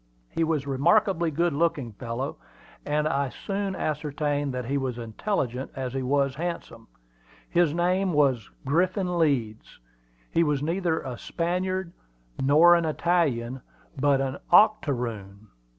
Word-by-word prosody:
He 165 Hz, -, 0 dB
was 155 Hz, -4 st, 0 dB
a -, -, -6 dB
remarkably 170 Hz, +5 st, +3 dB
good 170 Hz, +2 st, 0 dB
looking 145 Hz, -6 st, 0 dB
fellow, 120 Hz, +5 st, -4 dB, 0.5 s
and 150 Hz, +1 st, +1 dB
I 140 Hz, -3 st, 0 dB
soon 195 Hz, +5 st, -3 dB
ascertained 145 Hz, -1 st, -2 dB
that 125 Hz, -1 st, -4 dB
he 135 Hz, +4 st, -2 dB
was 130 Hz, -3 st, -2 dB
as 120 Hz, -, -5 dB
intelligent 125 Hz, -, -2 dB
as 130 Hz, -2 st, -4 dB
he 135 Hz, -, -2 dB
was 140 Hz, +1 st, +1 dB
handsome. 160 Hz, -9 st, -5 dB, 0.6 s
His 170 Hz, -3 st, +2 dB
name 180 Hz, +2 st, +1 dB
was 135 Hz, -, +2 dB, 0.2 s
Griffin 180 Hz, +4 st, +1 dB
Leeds. 120 Hz, -9 st, -1 dB, 0.5 s
He 170 Hz, -, +3 dB
was 145 Hz, -3 st, 0 dB
neither 170 Hz, 0 st, 0 dB
a 125 Hz, -3 st, -6 dB
Spaniard 180 Hz, +1 st, -2 dB, 0.5 s
nor 155 Hz, +6 st, +6 dB
an 170 Hz, -1 st, +3 dB
Italian, 145 Hz, -7 st, 0 dB, 0.3 s
but 140 Hz, 0 st, +2 dB
an 135 Hz, 0 st, -2 dB
octoroon. 120 Hz, -, +2 dB
145 Hz, 135 wpm, -26 LUFS, 130-170 Hz, 0.6 s, nor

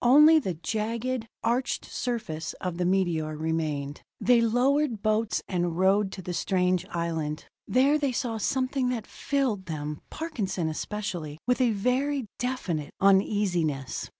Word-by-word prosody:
Only 300 Hz, +6 st, +8 dB
the 190 Hz, -, -3 dB
jagged, 230 Hz, +2 st, -2 dB, 0.2 s
arched 245 Hz, +2 st, 0 dB
surface 220 Hz, -11 st, -3 dB
of 180 Hz, -2 st, -5 dB
the 180 Hz, -, +1 dB
meteor 170 Hz, -5 st, +1 dB
remained. 155 Hz, -3 st, -2 dB, 0.2 s
They 245 Hz, -1 st, +4 dB
lowered 245 Hz, +1 st, +2 dB
boats 215 Hz, 0 st, +1 dB
and 175 Hz, -2 st, -1 dB
rowed 190 Hz, +2 st, +3 dB
to 190 Hz, -, -7 dB
the 180 Hz, -, -4 dB
strange 180 Hz, 0 st, +1 dB
island. 160 Hz, -3 st, -3 dB, 0.2 s
There 275 Hz, +4 st, +4 dB
they 280 Hz, -3 st, +1 dB
saw 235 Hz, -2 st, -2 dB
something 260 Hz, +3 st, 0 dB
that 235 Hz, -4 st, -2 dB
filled 255 Hz, -10 st, -1 dB
them 150 Hz, -2 st, -4 dB
Parkinson 220 Hz, -, -3 dB
especially 170 Hz, -3 st, -4 dB
with 250 Hz, +1 st, +2 dB
a 250 Hz, -, +4 dB
very 250 Hz, +5 st, 0 dB
definite 190 Hz, -, -2 dB
uneasiness. 190 Hz, -8 st, +2 dB
205 Hz, 135 wpm, -27 LUFS, 170-250 Hz, 0.2 s, Only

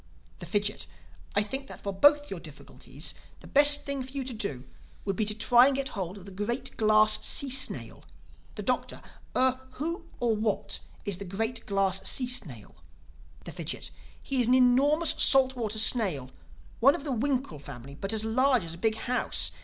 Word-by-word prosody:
The -, -, -8 dB
Fidgit: 205 Hz, 0 st, -2 dB, 0.5 s
"I 205 Hz, -, +3 dB
think 270 Hz, +6 st, -5 dB
that -, -, -10 dB
for 200 Hz, -, -3 dB
both 290 Hz, +8 st, +4 dB
your 190 Hz, -, -5 dB
difficulties 155 Hz, -4 st, -8 dB, 0.3 s
the -, -, -14 dB
best 290 Hz, 0 st, +6 dB
thing 280 Hz, -1 st, -3 dB
for 260 Hz, -, -7 dB
you 275 Hz, -1 st, -3 dB
to 255 Hz, -1 st, -6 dB
do 175 Hz, -, -4 dB, 0.4 s
would 195 Hz, -1 st, -1 dB
be 215 Hz, -, 0 dB
to 210 Hz, 0 st, -1 dB
try 240 Hz, +3 st, +5 dB
and 280 Hz, -, +1 dB
get 270 Hz, 0 st, -2 dB
hold 190 Hz, -1 st, -5 dB
of 190 Hz, -, -13 dB
the 200 Hz, -, -10 dB
Great 210 Hz, +7 st, -4 dB
Glass 215 Hz, 0 st, +4 dB
Sea 275 Hz, -2 st, +2 dB
Snail." 260 Hz, 0 st, +1 dB, 0.5 s
The -, -, -6 dB
Doctor: -, -, -2 dB, 0.3 s
"Er—who, 260 Hz, +7 st, -2 dB
or 235 Hz, -2 st, +1 dB
what, 215 Hz, -1 st, -2 dB, 0.3 s
is 200 Hz, -3 st, -4 dB
the 200 Hz, -, -6 dB
Great 225 Hz, +6 st, -4 dB
Glass 195 Hz, -1 st, 0 dB
Sea 255 Hz, -, +1 dB
Snail?" 165 Hz, -, -2 dB, 0.7 s
The -, -, -7 dB
Fidgit: -, -, -6 dB, 0.3 s
"He 265 Hz, -2 st, -2 dB
is 235 Hz, -, +2 dB
an 250 Hz, -, +4 dB
enormous 275 Hz, +6 st, +3 dB
salt 265 Hz, -1 st, +5 dB
water 220 Hz, -3 st, -3 dB
snail, 195 Hz, -, +3 dB, 0.5 s
one 275 Hz, +5 st, +5 dB
of -, -, -7 dB
the 290 Hz, -, -4 dB
winkle 255 Hz, -, -2 dB
family, 140 Hz, -1 st, -10 dB
but 195 Hz, +8 st, -5 dB
as 220 Hz, -1 st, -2 dB
large 250 Hz, +1 st, +2 dB
as 165 Hz, -1 st, -7 dB
a 170 Hz, -, -11 dB
big 220 Hz, +3 st, +1 dB
house. 245 Hz, +3 st, -1 dB
225 Hz, 185 wpm, -28 LUFS, 200-265 Hz, 0.7 s, best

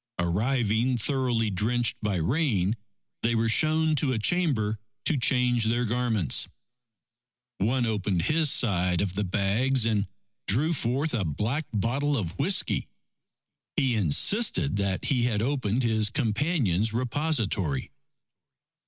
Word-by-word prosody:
Arriving 110 Hz, +6 st, 0 dB
thoroughly 120 Hz, -3 st, 0 dB
drenched 115 Hz, +5 st, 0 dB
by 105 Hz, -3 st, -1 dB
rain, 105 Hz, -, 0 dB, 0.5 s
they 115 Hz, +1 st, 0 dB
were 115 Hz, 0 st, +1 dB
shown 155 Hz, +6 st, +2 dB
to 140 Hz, -2 st, 0 dB
a -, -, -1 dB
chamber 110 Hz, -, 0 dB, 0.3 s
to 160 Hz, -, +2 dB
change 125 Hz, -3 st, +2 dB
their 120 Hz, +2 st, 0 dB
garments. 115 Hz, -, +1 dB, 1.1 s
One 120 Hz, +5 st, +1 dB
opened 100 Hz, -5 st, -1 dB
his 155 Hz, -, +2 dB
side 90 Hz, -8 st, +2 dB
of 95 Hz, -1 st, -1 dB
the 105 Hz, +2 st, -2 dB
bags, 110 Hz, +7 st, +1 dB
and 105 Hz, -3 st, 0 dB, 0.4 s
drew 150 Hz, +11 st, +2 dB
forth 135 Hz, +3 st, -1 dB
a 115 Hz, -5 st, 0 dB
black 110 Hz, -, -2 dB
bottle 135 Hz, +7 st, 0 dB
of 90 Hz, -8 st, -3 dB
whiskey. 185 Hz, +7 st, 0 dB, 0.9 s
He 130 Hz, -3 st, +1 dB
insisted 95 Hz, -, +3 dB
that 100 Hz, -2 st, -1 dB
he 130 Hz, -4 st, +1 dB
had 110 Hz, -3 st, 0 dB
opened 130 Hz, -3 st, -1 dB
his 110 Hz, -2 st, +1 dB
companion's 115 Hz, -, 0 dB
repository. 115 Hz, -, -1 dB
115 Hz, 125 wpm, -26 LUFS, 100-135 Hz, 1.1 s, insisted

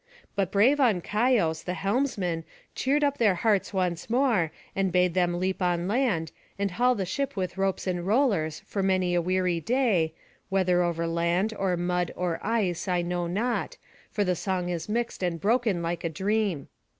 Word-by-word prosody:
But 190 Hz, -2 st, 0 dB
brave 240 Hz, +9 st, +4 dB
Ancaios 210 Hz, -, +2 dB
the 180 Hz, -, -2 dB
helmsman 195 Hz, -6 st, -1 dB, 0.3 s
cheered 285 Hz, +3 st, +1 dB
up 285 Hz, -1 st, +1 dB
their 210 Hz, -5 st, +4 dB
hearts 205 Hz, +1 st, +1 dB
once 180 Hz, -1 st, -2 dB
more, 230 Hz, -, +2 dB, 0.2 s
and 195 Hz, -1 st, +1 dB
bade 180 Hz, -1 st, +3 dB
them 175 Hz, -1 st, +1 dB
leap 190 Hz, +1 st, -1 dB
on 175 Hz, -1 st, +1 dB
land, 205 Hz, -, 0 dB, 0.3 s
and 200 Hz, -1 st, -1 dB
haul 250 Hz, +6 st, +2 dB
the 195 Hz, -4 st, -2 dB
ship 275 Hz, +8 st, -2 dB
with 185 Hz, -2 st, -3 dB
ropes 195 Hz, -1 st, -1 dB
and 180 Hz, -2 st, -1 dB
rollers 200 Hz, -, +1 dB
for 200 Hz, -, -3 dB
many 185 Hz, -2 st, +1 dB
a 175 Hz, -, +2 dB
weary 180 Hz, -1 st, 0 dB
day, 200 Hz, -7 st, +1 dB, 0.3 s
whether 185 Hz, -2 st, +2 dB
over 170 Hz, -1 st, 0 dB
land, 170 Hz, +5 st, 0 dB
or 190 Hz, -3 st, 0 dB
mud, 180 Hz, 0 st, -1 dB
or 175 Hz, -2 st, -2 dB
ice, 205 Hz, -6 st, -1 dB
I 180 Hz, -1 st, +1 dB
know 175 Hz, 0 st, -2 dB
not, 235 Hz, -, -2 dB, 0.3 s
for 205 Hz, -, 0 dB
the 180 Hz, -2 st, +1 dB
song 180 Hz, 0 st, -2 dB
is 175 Hz, +1 st, -4 dB
mixed 235 Hz, 0 st, -2 dB
and 175 Hz, -2 st, -1 dB
broken 215 Hz, -2 st, +1 dB
like 170 Hz, +1 st, -3 dB
a 165 Hz, -, 0 dB
dream. 195 Hz, -3 st, -1 dB
185 Hz, 175 wpm, -27 LUFS, 175-215 Hz, 0.3 s, brave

